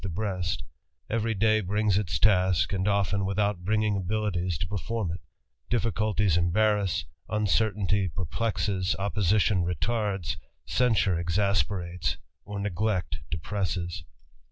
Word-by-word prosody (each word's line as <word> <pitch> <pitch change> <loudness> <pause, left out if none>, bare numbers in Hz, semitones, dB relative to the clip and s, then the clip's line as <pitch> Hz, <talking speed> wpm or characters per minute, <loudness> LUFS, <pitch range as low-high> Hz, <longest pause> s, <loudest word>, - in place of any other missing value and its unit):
the 100 - -2
JargasFT 90 -1 -2 0.5
every 115 0 0
d^'Y 110 +1 +3
brings 105 +1 +1
its 100 -5 0
task, 95 -4 +3
1 100 0 +1
without 100 -1 0
bringing 105 +1 +1
abilities 95 -3 -1
to 85 - -3
perform 105 +1 -2
it; 85 - -6 0.5
difficulties 110 -5 +1
5S, 100 +2 +2 0.2
uncertainty 105 -2 +1
perplexes, 95 +2 -1
opposition 100 -1 +2
retards, 95 -1 -1 0.3
censure 100 -8 +2
tes, 90 -2 0 0.3
or 105 0 -5
neglect 100 -1 -1
depresses. 90 0 -3
100 Hz, 105 wpm, -28 LUFS, 90-105 Hz, 0.5 s, d^'Y